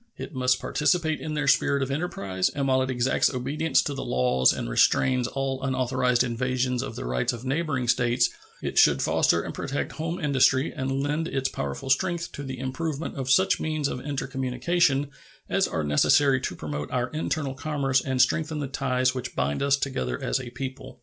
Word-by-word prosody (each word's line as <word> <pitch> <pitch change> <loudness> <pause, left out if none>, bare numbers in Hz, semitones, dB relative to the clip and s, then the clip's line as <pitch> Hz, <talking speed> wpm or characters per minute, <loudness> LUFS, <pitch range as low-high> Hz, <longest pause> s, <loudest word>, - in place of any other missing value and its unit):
It - - -7
must 130 -1 +2
participate 155 +1 0
in 155 -1 -4
their 145 -2 -1
spirit 140 0 +3
of 135 - -3
enterprise, 100 - -1
and 140 -1 -2
while 130 0 +3
it 130 - -1
exacts 125 0 +2
obedience 140 +4 0
to 145 - -3
the 135 - -4
laws 65 0 +3
and - - -4
restrains 125 - +3
all 135 0 -3
unauthorized 130 -1 +1
invasions 125 +1 -1
of - - -6
the - - -5
rights 60 - 0
of 120 +2 -8
neighboring 135 -2 -1
states, 120 0 +2 0.3
it - - +1
should - - +5
foster 85 - +2
and - - -6
protect 140 +1 -3
home 165 +3 -4
industry 135 -2 +2
and 135 +1 -2
lend 150 +3 -1
its 135 -4 -1
powerful 70 - -4
strength 170 +4 0
to 140 - -7
the 130 -2 -6
improvement 150 +3 -4
of 135 -2 -4
such 190 +8 +4
means 155 -2 -1
of 125 - -4
intercommunication 140 +2 0 0.4
as - - +1
are 80 - -2
necessary 130 - +3
to 90 - -3
promote 75 -2 -5
our 125 0 -1
internal 155 -2 -2
commerce 135 -2 0
and 130 -2 +3
strengthen 155 +4 -1
the 145 - -2
ties 130 -1 0
which 130 -1 -5
bind 70 +1 -1
us 140 0 +3
together 65 - -2
as - - -1
a 120 - -7
people. 130 +2 -7
130 Hz, 190 wpm, -26 LUFS, 125-145 Hz, 0.4 s, should